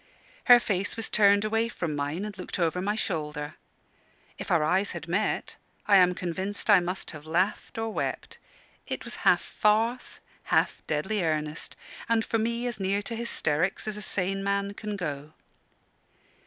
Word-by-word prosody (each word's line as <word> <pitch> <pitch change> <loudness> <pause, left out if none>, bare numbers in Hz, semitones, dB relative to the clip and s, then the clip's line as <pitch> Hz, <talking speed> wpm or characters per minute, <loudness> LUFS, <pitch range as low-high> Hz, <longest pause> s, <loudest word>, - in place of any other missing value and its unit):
Her 245 -2 +9
face 200 -1 -1
was 225 - -1
turned 205 0 +4
away 225 +2 +1
from 170 -9 -3
mine, 145 +7 -2
and 210 -2 -6
looked 185 - -5
over 175 0 0
my 205 +3 0
shoulder; 150 -7 -3 0.9
if - - -6
our 170 -4 +3
eyes 190 +6 +1
had 170 -2 -7
met, 195 +6 -1 0.3
I 200 -2 +6
am 180 -1 +5
convinced 190 +5 -2
I 200 - +8
must 180 +2 -4
have 155 -1 -11
laughed 180 +8 -1
or 225 0 -1
wept. - - -4 0.5
It - - -4
was - - -5
half - - +3
farce, 225 +4 0 0.3
half - - +1
deadly 185 +7 -1
earnest, 155 -1 -2 0.3
and 230 -1 +2
for 225 - 0
me 235 +2 -1
as 240 -4 -3
near 195 +1 0
to 230 - -4
hysterics 185 -6 -1
as 215 - -2
a 210 - -6
sane 195 0 0
man 200 0 0
can 210 0 -5
go. 150 -5 -5
195 Hz, 170 wpm, -27 LUFS, 165-215 Hz, 0.9 s, Her